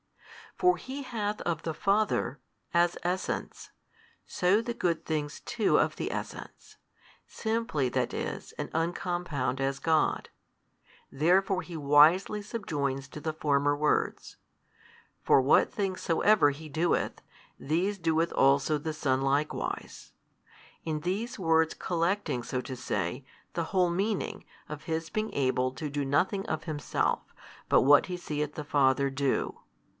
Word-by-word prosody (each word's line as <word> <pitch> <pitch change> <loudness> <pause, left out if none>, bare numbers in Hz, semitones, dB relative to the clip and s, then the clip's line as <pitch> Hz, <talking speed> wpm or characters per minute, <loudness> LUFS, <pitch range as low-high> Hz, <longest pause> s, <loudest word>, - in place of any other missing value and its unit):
For 360 -1 +4
He 275 +2 -6
hath 215 -4 -3
of 165 -2 -2
the 160 - -3
Father, 195 - +1 0.3
as 170 0 +3
Essence, 180 +2 -3 0.6
so 195 +3 +2
the 235 +1 -4
good 170 -7 -1
things 150 -1 -2
too 230 -4 +1
of - - +2
the - - -3
Essence, - - -7 0.5
simply 220 - -1
that - - -1
is - - -4
and - - -6
uncompound 165 -5 -1
as 135 0 -1
God, 160 +1 +1 0.8
therefore 185 +6 +2
He 175 -3 -8
wisely 155 +8 +5
subjoins 145 - -3
to 150 - -8
the 155 +1 -2
former 145 -2 +1
words, 150 +1 -1 0.9
For - - +5
what 130 +1 +4
things 195 -3 -2
soever 175 -1 +4
He 150 +3 -7
doeth, 160 +4 0 0.4
these 180 +7 0
doeth 165 -1 +1
also 140 +2 +3
the 155 +2 -4
Son 135 -4 0
likewise: 140 +3 -2 0.7
in 155 -2 -2
these 205 +8 -3
words 160 -2 +3
collecting, 170 -6 -1
so 125 - -3
to 130 +1 -6
say, 105 -4 -3 0.3
the 170 - -1
whole 180 0 +2
meaning 195 +4 -2 0.2
of 150 0 -7
His 165 0 -3
being 215 0 -2
able 130 -1 +1
to 145 +3 -5
do 145 0 -2
nothing 190 +9 +1
of - - -2
Himself, 150 -5 -1 0.5
but - - +5
what 145 +2 +6
He 180 -1 -4
seeth 150 -3 -3
the 150 - -4
Father 140 -1 +2
do. 135 0 -1
160 Hz, 140 wpm, -29 LUFS, 145-185 Hz, 0.9 s, what